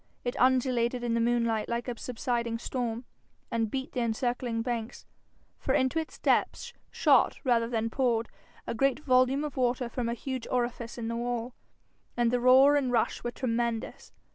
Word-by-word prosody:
It 245 Hz, -, -2 dB
undulated 250 Hz, -1 st, +2 dB
in 235 Hz, -1 st, 0 dB
the 230 Hz, -, +1 dB
moonlight 230 Hz, -2 st, +1 dB
like 235 Hz, +1 st, -2 dB
a 245 Hz, -, -3 dB
subsiding 235 Hz, -1 st, -2 dB
storm, 240 Hz, 0 st, -3 dB, 0.5 s
and 225 Hz, -2 st, 0 dB
beat 265 Hz, +3 st, -4 dB
the 255 Hz, -, -3 dB
encircling 235 Hz, 0 st, -1 dB
banks. 235 Hz, -2 st, -4 dB, 0.5 s
For -, -, 0 dB
into 260 Hz, +5 st, +2 dB
its 320 Hz, -, -6 dB
depths -, -, 0 dB, 0.2 s
shot -, -, +3 dB
rather 235 Hz, -4 st, +2 dB
than 230 Hz, -1 st, -1 dB
poured 235 Hz, -3 st, +1 dB, 0.4 s
a -, -, -3 dB
great 270 Hz, +3 st, +1 dB
volume 255 Hz, +1 st, +3 dB
of 295 Hz, -3 st, -5 dB
water 245 Hz, -1 st, 0 dB
from 240 Hz, -1 st, -2 dB
a 235 Hz, -, -1 dB
huge 260 Hz, -1 st, -5 dB
orifice 240 Hz, -1 st, -2 dB
in 230 Hz, -1 st, -4 dB
the 230 Hz, -, -2 dB
wall, 240 Hz, 0 st, -3 dB, 0.6 s
and 240 Hz, -1 st, +2 dB
the 245 Hz, -, +1 dB
roar 260 Hz, +4 st, +6 dB
and 280 Hz, -3 st, +1 dB
the 250 Hz, -, -2 dB
rush 230 Hz, -, 0 dB
were 240 Hz, -, -1 dB
tremendous. 235 Hz, -2 st, -3 dB
240 Hz, 175 wpm, -29 LUFS, 230-255 Hz, 0.6 s, roar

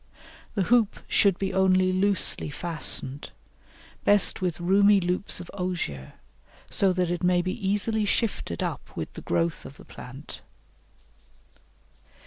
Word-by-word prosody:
The 200 Hz, -, +1 dB
hoop 230 Hz, +1 st, +2 dB
should 195 Hz, -3 st, +3 dB
be 195 Hz, -1 st, -2 dB
only 185 Hz, -1 st, +3 dB
loosely 195 Hz, -4 st, +1 dB
fastened 150 Hz, -4 st, -1 dB, 0.7 s
best 205 Hz, -2 st, +4 dB
with 180 Hz, -3 st, -2 dB
roomy 200 Hz, +3 st, +4 dB
loops 180 Hz, +2 st, -1 dB
of 175 Hz, -, -9 dB
osier, 175 Hz, -, -4 dB, 0.6 s
so 195 Hz, -1 st, +3 dB
that 180 Hz, -1 st, 0 dB
it 175 Hz, -, -2 dB
may 180 Hz, 0 st, +3 dB
be 185 Hz, +1 st, -2 dB, 0.2 s
easily 210 Hz, +1 st, 0 dB
shifted 205 Hz, -, -1 dB
up -, -, -4 dB
with -, -, -5 dB
the -, -, -8 dB
growth 85 Hz, -1 st, -1 dB
of -, -, -11 dB
the -, -, -14 dB
plant. -, -, -11 dB
185 Hz, 130 wpm, -26 LUFS, 175-200 Hz, 0.7 s, best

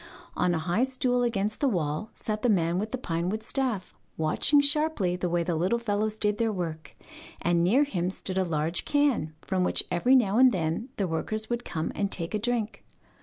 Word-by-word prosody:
On 180 Hz, -1 st, +1 dB
a -, -, 0 dB
high 175 Hz, +8 st, 0 dB
stool 255 Hz, -1 st, 0 dB
against 215 Hz, -3 st, -1 dB
the 285 Hz, -, +2 dB
wall 160 Hz, 0 st, -2 dB
sat 215 Hz, -1 st, -3 dB
the 245 Hz, -, +2 dB
man 175 Hz, -3 st, +2 dB
with 215 Hz, +2 st, -3 dB
the 260 Hz, -, -2 dB
pinewood 185 Hz, 0 st, -2 dB
staff, 245 Hz, -6 st, -2 dB, 0.2 s
watching 160 Hz, -, +3 dB
sharply 285 Hz, -, +2 dB
the 180 Hz, 0 st, -2 dB
way 170 Hz, 0 st, +1 dB
the 170 Hz, -, -1 dB
little 180 Hz, +8 st, +1 dB
fellows 215 Hz, -2 st, -1 dB
did 210 Hz, 0 st, 0 dB
their 225 Hz, -1 st, +1 dB
work, 165 Hz, -5 st, -5 dB, 0.4 s
and 170 Hz, 0 st, +1 dB
near 235 Hz, +11 st, +4 dB
him 185 Hz, -11 st, -2 dB
stood 190 Hz, 0 st, -3 dB
a -, -, +2 dB
large 165 Hz, 0 st, -1 dB
can, 280 Hz, -, +1 dB
from 185 Hz, -1 st, 0 dB
which -, -, +2 dB
every 245 Hz, +10 st, +3 dB
now 225 Hz, -3 st, +3 dB
and 260 Hz, -1 st, +7 dB
then 180 Hz, +6 st, -2 dB
the 195 Hz, -, -1 dB
workers 215 Hz, +7 st, -3 dB
would 240 Hz, 0 st, -1 dB
come 160 Hz, -7 st, -3 dB
and 200 Hz, -1 st, -2 dB
take 165 Hz, +1 st, -3 dB
a 215 Hz, -, 0 dB
drink. 230 Hz, -1 st, -2 dB
205 Hz, 205 wpm, -27 LUFS, 175-240 Hz, 0.4 s, and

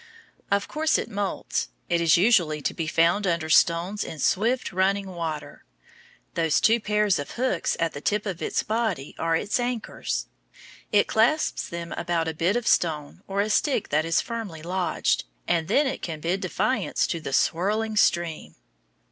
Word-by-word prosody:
Of 200 Hz, 0 st, +1 dB
course 315 Hz, +1 st, +1 dB
it 235 Hz, -, -4 dB
moults. 200 Hz, -1 st, -2 dB, 0.2 s
It 170 Hz, -1 st, +1 dB
is 165 Hz, 0 st, +5 dB
usually 170 Hz, -6 st, +3 dB
to -, -, 0 dB
be 165 Hz, -, -3 dB
found 170 Hz, +5 st, +2 dB
under 170 Hz, -2 st, 0 dB
stones 175 Hz, +6 st, +3 dB
in 160 Hz, -, -7 dB
swift, 225 Hz, -, +1 dB
running 195 Hz, +2 st, +1 dB
water. 165 Hz, -4 st, -5 dB, 0.7 s
Those 165 Hz, -3 st, +2 dB
two 225 Hz, +2 st, +4 dB
pairs 210 Hz, -4 st, +1 dB
of 145 Hz, -, -5 dB
hooks 245 Hz, -7 st, 0 dB
at 165 Hz, -1 st, 0 dB
the 145 Hz, -, -7 dB
tip 210 Hz, +4 st, 0 dB
of 190 Hz, -4 st, -4 dB
its -, -, -1 dB
body 215 Hz, -, -2 dB
are 165 Hz, 0 st, +1 dB
its 205 Hz, +8 st, 0 dB
anchors. 245 Hz, -1 st, -3 dB, 0.7 s
It 205 Hz, -1 st, +4 dB
clasps 240 Hz, +8 st, +1 dB
them 170 Hz, 0 st, -6 dB
about 170 Hz, -1 st, -1 dB
a 160 Hz, -, -2 dB
bit 170 Hz, +6 st, +1 dB
of 240 Hz, -1 st, -1 dB
stone 155 Hz, -3 st, 0 dB
or 195 Hz, +1 st, 0 dB
a 210 Hz, -, -1 dB
stick 265 Hz, -1 st, +1 dB
that 150 Hz, +2 st, +2 dB
is 165 Hz, 0 st, +2 dB
firmly 215 Hz, -10 st, -6 dB
lodged, 180 Hz, -, 0 dB, 0.2 s
and 165 Hz, -2 st, +1 dB
then 275 Hz, +10 st, +3 dB
it 265 Hz, 0 st, -3 dB
can 160 Hz, -3 st, -5 dB
bid 175 Hz, +5 st, -1 dB
defiance 210 Hz, +7 st, 0 dB
to 170 Hz, -, -2 dB
the 145 Hz, -, -5 dB
swirling 210 Hz, +10 st, +1 dB
stream. 170 Hz, -5 st, +1 dB
185 Hz, 175 wpm, -25 LUFS, 165-215 Hz, 0.7 s, is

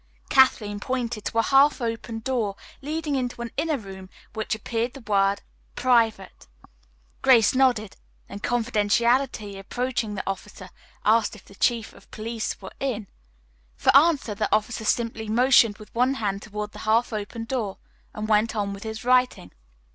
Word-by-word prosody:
Kathleen 215 Hz, -6 st, +3 dB
pointed 240 Hz, -2 st, -3 dB
to -, -, -3 dB
a 225 Hz, -, +4 dB
half 275 Hz, +4 st, +4 dB
open 230 Hz, -1 st, -4 dB
door 230 Hz, -5 st, -1 dB, 0.3 s
leading 305 Hz, +1 st, -2 dB
into 250 Hz, -2 st, -2 dB
an 235 Hz, -, -6 dB
inner 315 Hz, -2 st, 0 dB
room 195 Hz, -4 st, -10 dB
on -, -, -19 dB, 0.2 s
which 220 Hz, 0 st, -2 dB
appeared 230 Hz, +2 st, -3 dB
the 275 Hz, -, -10 dB
word 200 Hz, -2 st, +1 dB, 0.3 s
"Private." 230 Hz, -, +1 dB, 0.7 s
Grace 235 Hz, -6 st, +5 dB
nodded: 245 Hz, -6 st, +2 dB, 0.3 s
then, 200 Hz, -, -8 dB
confidently 235 Hz, -1 st, +1 dB
approaching 245 Hz, +1 st, -3 dB
the 190 Hz, -, -3 dB
officer, 195 Hz, -1 st, -6 dB, 0.3 s
asked 220 Hz, +1 st, +3 dB
if 210 Hz, -, -16 dB
the -, -, -16 dB
Chief 230 Hz, +2 st, 0 dB
of -, -, -19 dB
Police 225 Hz, +1 st, -4 dB
were 190 Hz, -, -10 dB
in. 225 Hz, -8 st, -3 dB, 0.7 s
For -, -, +2 dB
answer 285 Hz, -6 st, +4 dB
the 210 Hz, +1 st, -2 dB
officer 215 Hz, +1 st, 0 dB
simply 225 Hz, 0 st, -1 dB
motioned 230 Hz, -2 st, +4 dB
with 215 Hz, -, -14 dB
one 250 Hz, +3 st, +2 dB
hand 200 Hz, -5 st, -2 dB
toward 210 Hz, 0 st, -6 dB
the 210 Hz, -, -11 dB
half 225 Hz, +2 st, +1 dB
open 215 Hz, +2 st, -4 dB
door 230 Hz, -6 st, -3 dB, 0.3 s
and 215 Hz, 0 st, -5 dB
went 220 Hz, +1 st, +2 dB
on 200 Hz, -2 st, -1 dB
with 200 Hz, -, -9 dB
his 220 Hz, +1 st, -6 dB
writing. 250 Hz, -, +2 dB
225 Hz, 160 wpm, -25 LUFS, 210-250 Hz, 0.7 s, Grace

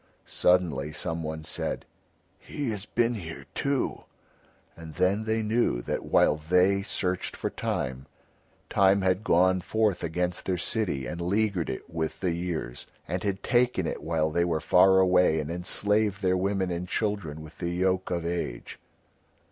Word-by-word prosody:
Suddenly 80 Hz, -5 st, +1 dB
someone 80 Hz, -1 st, -3 dB
said: -, -, -3 dB, 0.5 s
"He 140 Hz, -5 st, -4 dB
has 105 Hz, -2 st, -4 dB
been 120 Hz, 0 st, +1 dB
here 85 Hz, -8 st, -7 dB
too." 140 Hz, -2 st, -1 dB, 0.7 s
And 80 Hz, -2 st, -10 dB
then 100 Hz, +4 st, +1 dB
they 110 Hz, 0 st, 0 dB
knew 110 Hz, -, +1 dB
that -, -, -3 dB
while 75 Hz, -, +3 dB
they 90 Hz, +5 st, +3 dB
searched 95 Hz, -3 st, -2 dB
for -, -, -3 dB
Time, 65 Hz, +1 st, -3 dB, 0.6 s
Time 95 Hz, 0 st, +3 dB
had 95 Hz, +2 st, +1 dB
gone 95 Hz, 0 st, +3 dB
forth 110 Hz, -1 st, 0 dB
against 90 Hz, +2 st, -2 dB
their 95 Hz, -1 st, +1 dB
city 85 Hz, -, -1 dB
and 85 Hz, +8 st, -5 dB
leaguered 100 Hz, -1 st, 0 dB
it 65 Hz, -, -5 dB
with 80 Hz, -1 st, -3 dB
the 90 Hz, -2 st, 0 dB
years, 85 Hz, -7 st, -4 dB, 0.2 s
and -, -, -2 dB
had 100 Hz, -1 st, -2 dB
taken 120 Hz, -7 st, +2 dB
it -, -, -3 dB
while 80 Hz, -1 st, 0 dB
they 85 Hz, +2 st, +2 dB
were 85 Hz, -2 st, 0 dB
far 95 Hz, +4 st, +5 dB
away 90 Hz, -3 st, +4 dB
and 75 Hz, +1 st, -3 dB
enslaved 100 Hz, +3 st, +1 dB
their 90 Hz, 0 st, +3 dB
women 95 Hz, 0 st, 0 dB
and 90 Hz, +1 st, -3 dB
children 90 Hz, -7 st, -2 dB
with 80 Hz, +1 st, -14 dB
the 85 Hz, -, -2 dB
yoke 95 Hz, +1 st, 0 dB
of 85 Hz, -2 st, -2 dB
age. 85 Hz, -8 st, -4 dB
90 Hz, 155 wpm, -27 LUFS, 80-100 Hz, 0.7 s, far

